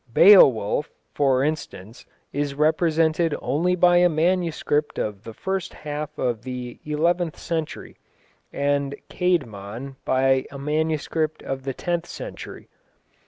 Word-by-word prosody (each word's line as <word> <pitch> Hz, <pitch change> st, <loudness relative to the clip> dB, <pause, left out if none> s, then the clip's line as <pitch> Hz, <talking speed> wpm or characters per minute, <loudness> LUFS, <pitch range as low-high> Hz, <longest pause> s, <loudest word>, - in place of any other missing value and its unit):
Beowulf, 140 Hz, -, +6 dB, 0.2 s
for 135 Hz, -2 st, +2 dB
instance, 130 Hz, -8 st, -5 dB, 0.3 s
is 145 Hz, 0 st, -2 dB
represented 160 Hz, +1 st, +2 dB
only 165 Hz, +8 st, 0 dB
by 175 Hz, 0 st, +5 dB
a 175 Hz, 0 st, +5 dB
manuscript 160 Hz, -2 st, 0 dB
of 105 Hz, -1 st, -3 dB
the 115 Hz, -, -8 dB
first 190 Hz, -2 st, -3 dB
half 150 Hz, 0 st, -6 dB
of 120 Hz, -4 st, -1 dB
the 125 Hz, -1 st, -7 dB
eleventh 165 Hz, +2 st, 0 dB
century, 160 Hz, -2 st, -5 dB, 0.5 s
and 140 Hz, 0 st, 0 dB, 0.2 s
Caedmon 130 Hz, -, -2 dB
by 130 Hz, 0 st, +2 dB
a 140 Hz, -, -9 dB
manuscript 155 Hz, +2 st, -1 dB
of 135 Hz, 0 st, -5 dB
the 135 Hz, -2 st, -3 dB
tenth 175 Hz, -1 st, -2 dB
century. -, -, -8 dB
150 Hz, 120 wpm, -23 LUFS, 135-165 Hz, 0.5 s, Beowulf